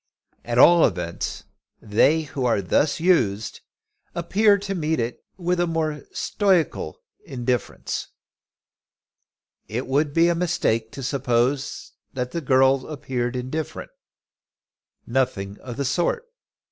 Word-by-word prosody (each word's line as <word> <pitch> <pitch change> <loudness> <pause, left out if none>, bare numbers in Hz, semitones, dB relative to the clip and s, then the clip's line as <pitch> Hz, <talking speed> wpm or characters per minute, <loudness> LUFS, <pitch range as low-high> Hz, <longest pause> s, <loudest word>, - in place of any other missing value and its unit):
At 120 0 -2
all 170 +6 +7
events, 90 -4 -1 0.4
they 140 +10 +3
who 140 -3 -5
are 120 -4 +2
thus 140 - +1
used 110 - +1 0.5
appear 200 +5 +3
to 200 0 -4
meet 160 -3 -1
it 120 +1 -3
with 180 -1 0
a 175 - +2
more 155 -3 -2
stoical 195 - 0 0.3
indifference. 125 - -3 1.6
It 120 +4 -3
would 145 +3 +1
be 165 +3 +4
a 170 - +3
mistake 115 -10 0
to 135 - -7
suppose 130 +1 0 0.2
that 125 -1 -3
the 170 - -3
girl 130 -1 +3
appeared 130 -4 -3
indifferent. 130 +5 -4 1.1
Nothing 105 -6 -1
of 120 -2 -8
the 140 - -1
sort. 175 - 0
135 Hz, 120 wpm, -23 LUFS, 120-165 Hz, 1.6 s, all